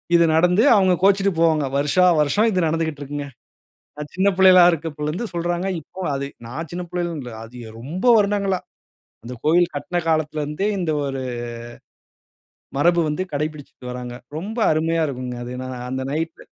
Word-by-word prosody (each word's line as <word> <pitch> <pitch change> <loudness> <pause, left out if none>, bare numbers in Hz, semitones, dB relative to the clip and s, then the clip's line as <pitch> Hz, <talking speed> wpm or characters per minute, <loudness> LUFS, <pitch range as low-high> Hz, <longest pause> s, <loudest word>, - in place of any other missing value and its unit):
இது 170 - +6
நடந்து 180 +6 +4
அவுங்க 190 -3 +4
கோச்சுட்டு 195 0 +4
போவாங்க. 160 -3 +3
வருஷா 150 +6 +3 0.2
வருஷம் 150 +10 +2
இது 185 - 0
நடந்துகிட்ருக்குங்க. 145 -3 -3 0.7
நான் 150 0 -7
சின்ன 190 +2 +2
பிள்ளைகளா 185 -1 +7
இருக்கப்போலருந்து 160 +4 -3
சொல்றாங்க. 175 +2 -1
இப்போ, 160 +5 -12
அது 140 0 -3 0.2
நான் 150 +8 -6
சின்ன 175 +1 -4
பிள்ளையிலன்னு 175 -3 -3
இல்ல, 120 -2 -8
அது 115 +2 -14
எ - - -10
ரொம்ப 160 - -6
வருடங்களா. 200 -3 +1 0.7
இந்த 125 +1 -6
கோயில் 175 +3 +4
கட்டுன 175 +5 -2
காலத்திலருந்தே, 155 +3 -1
இந்த 170 -3 -1
ஒரு 135 -1 -3 1.6
மரபு 170 +3 +4
வந்து 150 +4 -1
கடைபிடிச்சுட்டு 145 -4 -5
வர்றாங்க. 125 -1 -6 0.2
ரொம்ப 210 +8 -6
அருமையா 165 +1 +1
இருக்கும்ங்க. 125 -2 -5
அது 120 - -6
ந - - -5 0.2
அந்த 130 0 -3
நைட். 160 +2 -3
160 Hz, 150 wpm, -22 LUFS, 145-180 Hz, 1.6 s, பிள்ளைகளா